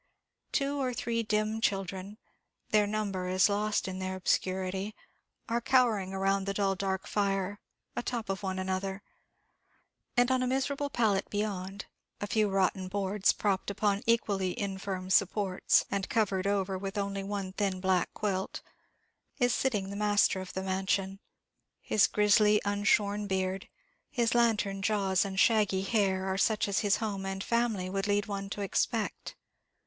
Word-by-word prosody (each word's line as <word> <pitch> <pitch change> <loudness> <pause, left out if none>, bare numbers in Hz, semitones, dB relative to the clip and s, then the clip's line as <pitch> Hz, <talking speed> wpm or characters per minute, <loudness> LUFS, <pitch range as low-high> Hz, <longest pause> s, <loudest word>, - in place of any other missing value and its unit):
Two 280 0 0
or 255 -2 -1
three 230 -1 -1
dim 215 0 0
children 195 -1 -2 0.5
their 210 -1 +4
number 200 -3 -2
is 185 +2 +4
lost 210 0 0
in 190 0 -4
their 185 0 -3
obscurity 190 +2 -1 0.5
are 235 +1 0
cowering 235 -7 +2
round 195 0 0
the 200 - -1
dull, 195 -1 +2
dark 190 0 -2
fire, 200 -1 -1 0.4
atop 240 -2 -3
of 195 0 -3
one 190 -1 -3
another; 190 +1 -3 1.1
and 245 +1 +4
on 260 -1 +2
a 255 - +1
miserable 275 +2 -1
pallet 220 -7 +1
beyond 200 -2 -3 0.3
a - - -2
few 215 0 +1
rotten 190 -1 +1
boards, 200 +1 +1
propped 200 -2 -1
upon 200 0 0
equally 200 -5 +1
infirm 190 -2 -4
supports, 195 -1 +3
and 195 -1 -2
covered 200 -4 +1
over 195 -2 0
with 195 +1 -5
only 200 -1 -2
one 195 -1 -4
thin 195 -2 -1
black 185 -1 +1
quilt 190 -3 -2 0.7
is 245 -3 +2
sitting 205 -7 0
the - - -5
master 205 -2 +2
of 185 - -8
the 190 - -3
mansion; 190 0 -1 0.6
his 210 - +3
grizzly, 210 0 +4
unshorn 205 0 +1
beard, 190 0 -2 0.4
his 235 -4 +1
lantern 220 -5 +2
jaws 195 -2 +2
and 195 -1 -3
shaggy 205 -4 +3
hair, 195 -2 +1
are 190 0 -1
such 215 +1 +2
as 200 - +1
his 205 -2 +3
home 205 -3 -3
and 195 0 -3
family 235 -6 0
would 195 +1 -2
lead 205 0 +1
one 195 -1 -4
to 205 - -5
expect. 210 +3 -1
200 Hz, 155 wpm, -30 LUFS, 190-215 Hz, 1.1 s, their